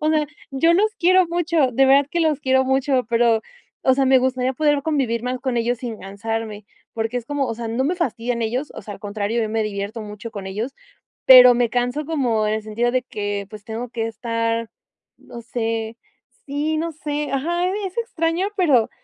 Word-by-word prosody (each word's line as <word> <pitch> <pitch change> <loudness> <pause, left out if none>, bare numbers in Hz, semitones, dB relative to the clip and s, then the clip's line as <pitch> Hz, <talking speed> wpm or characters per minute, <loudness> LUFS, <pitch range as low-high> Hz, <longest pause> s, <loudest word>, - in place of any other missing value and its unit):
O 305 +1 +1
sea, 305 -1 +2 0.2
yo 285 +5 +3
los 425 +4 +3
quiero 370 +1 +4
mucho, 335 -5 +1
de 270 +3 +4
verdad 275 +1 +5
que 345 - 0
los 310 -3 +1
quiero 265 -1 +2
mucho, 265 0 +1
pero, 230 -1 +3 0.4
o 260 - +6
sea, 270 0 +2
me 265 - +6
gustaría 255 0 0
poder 295 0 +2
convivir 270 -7 0
mas 250 0 -3
con 260 -3 -2
ellos 240 +1 0
sin 230 -3 -6
cansarme, 210 +2 -5 0.3
porque 225 +2 -2
es 235 - -10
como, 290 -1 -1
o - - -2
sea, 230 0 -5
no 235 +4 -1
me 330 +6 +1
fastidian 245 -7 -2
ellos, 250 +6 -2
o - - -7
sea, 210 - -7
al - - -14
contrario, 205 +3 -2
yo 220 - -2
me 225 0 0
divierto 205 +2 -4
mucho 210 +2 -8
con 200 -3 -7
ellos. 220 +8 -4 0.5
Pero 250 -1 +10
me 240 -1 +1
canso 245 +5 -1
como 245 -9 0
en 210 - +1
el 220 - -3
sentido 225 +3 -1
de 255 - +2
que, 205 -4 -4
pues, 210 -2 -11
tengo 230 +3 -5
que 225 -2 -2
estar, 230 0 -2 0.5
no 235 - -11
sé 225 -1 -3 0.5
sí, 295 +3 -1
no 330 +1 -2
sé 295 -1 -4
ajá, 340 +6 0
e 400 +1 -2
es 370 - -8
extraño 355 -5 -1
pero 280 - +3
250 Hz, 210 wpm, -21 LUFS, 225-290 Hz, 0.5 s, Pero